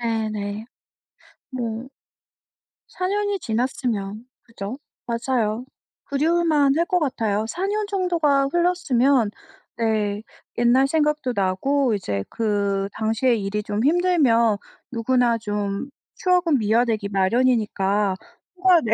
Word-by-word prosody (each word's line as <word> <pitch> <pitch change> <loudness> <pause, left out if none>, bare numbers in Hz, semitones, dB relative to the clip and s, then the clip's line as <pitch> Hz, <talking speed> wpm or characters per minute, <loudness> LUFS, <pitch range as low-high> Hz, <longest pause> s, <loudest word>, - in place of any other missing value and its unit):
네네. 215 -2 -2 0.9
뭐 240 -1 -4 1.0
4 365 - -3
년이 410 0 0
지났으면 225 - -2 0.2
그죠, 230 +1 -7 0.3
맞아요. 235 -1 -1 0.4
그리울만 300 -1 +2
할 335 - +2
것 360 0 +1
같아요. 220 -8 -1
4 360 +10 -3
년 420 0 -1
정도가 340 -8 +2
흘렀으면 280 - +2 0.5
네 215 -3 0 0.4
옛날 245 +3 +4
생각도 300 -3 0
나고 225 +7 +1
이제 100 - -3
그 200 -3 0
당시에 225 +3 +1
일이 210 0 -2
좀 210 +1 -2
힘들면 280 - +3 0.3
누구나 240 0 +2
좀 205 +2 -3 0.3
추억은 360 -6 +2
미화되기 220 -1 +1
마련이니까 205 -1 +1 0.4
휴가 365 -2 +5
내 225 -1 +1
235 Hz, 220 characters per minute, -23 LUFS, 210-295 Hz, 1.0 s, 휴가